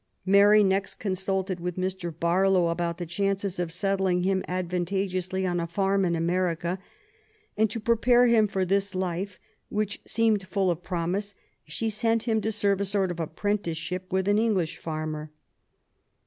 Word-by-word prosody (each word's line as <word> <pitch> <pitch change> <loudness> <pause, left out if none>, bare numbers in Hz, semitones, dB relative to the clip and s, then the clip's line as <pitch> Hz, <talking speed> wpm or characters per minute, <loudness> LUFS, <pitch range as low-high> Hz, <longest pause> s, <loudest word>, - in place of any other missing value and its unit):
Mary 205 +2 +6
next 195 0 0
consulted 190 -1 -2
with 175 0 -3
Mr. 185 -1 -2
Barlow 175 +2 +2
about 170 0 -2
the 175 - -4
chances 195 +2 -1
of 175 -2 -2
settling 190 -1 0
him 190 0 +1
advantageously 185 +1 -2
on 175 -1 0
a 170 - -2
farm 195 +2 +1
in 170 -1 +1
America; 170 +1 0 0.8
and 220 0 +2
to 230 - -4
prepare 235 +2 +4
him 230 -3 +4
for 190 -2 -1
this 200 +1 0
life, 185 +1 -2 0.3
which 210 -1 -2
seemed 220 -4 +1
full 190 -1 +1
of 170 0 -4
promise, 185 +3 -2 0.3
she 155 +9 -3
sent 225 +1 0
him 225 -2 +1
to 220 +2 -1
serve 200 -2 +1
a - - +1
sort 195 -2 +1
of 175 - -6
apprentice* 170 +1 -2
ship 180 +3 -5
with 190 +1 0
an 205 +1 +4
English 200 -8 0
farmer. 155 -1 -4
190 Hz, 160 wpm, -27 LUFS, 175-200 Hz, 0.8 s, Mary